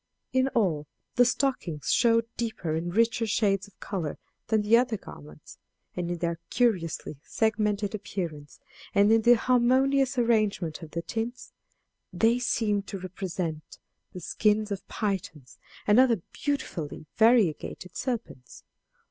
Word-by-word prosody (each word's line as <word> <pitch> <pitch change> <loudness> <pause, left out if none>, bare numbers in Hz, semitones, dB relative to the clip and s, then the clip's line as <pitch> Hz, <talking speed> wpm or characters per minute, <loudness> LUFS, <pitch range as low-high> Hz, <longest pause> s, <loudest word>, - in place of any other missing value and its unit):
In 260 0 +3
all, 165 -10 +1 0.3
the 245 - +5
stockings 245 - -1
showed 230 -1 +4
deeper 220 -9 -3
and 170 +3 -3
richer 230 0 +2
shades 200 -2 +1
of 200 - -23
color 175 -7 -4 0.3
than 215 -1 +2
the 215 +2 +5
other 235 -2 +2
garments; 75 - -13 0.4
and 175 -1 -3
in 175 - -2
their 170 0 -2
curiously 180 - 0
segmented 210 0 0
appearance, 170 -8 -5 0.4
and 200 +1 +5
in 225 0 +5
the 240 +2 +6
harmonious 260 +3 +2
arrangement 215 -9 +1
of 160 - -9
the 170 +2 -4
tints, 235 +5 -5 0.6
they 230 +2 +2
seemed 210 -4 0
to 200 - -5
represent 180 -4 -5 0.3
the 180 - -8
skins 210 +4 +1
of 200 -1 -5
pythons 155 - -4 0.3
and 210 +3 +5
other 235 -8 +4
beautifully 180 - -3
variegated 210 - +2
serpents. 230 - -5
210 Hz, 130 wpm, -27 LUFS, 170-235 Hz, 0.6 s, the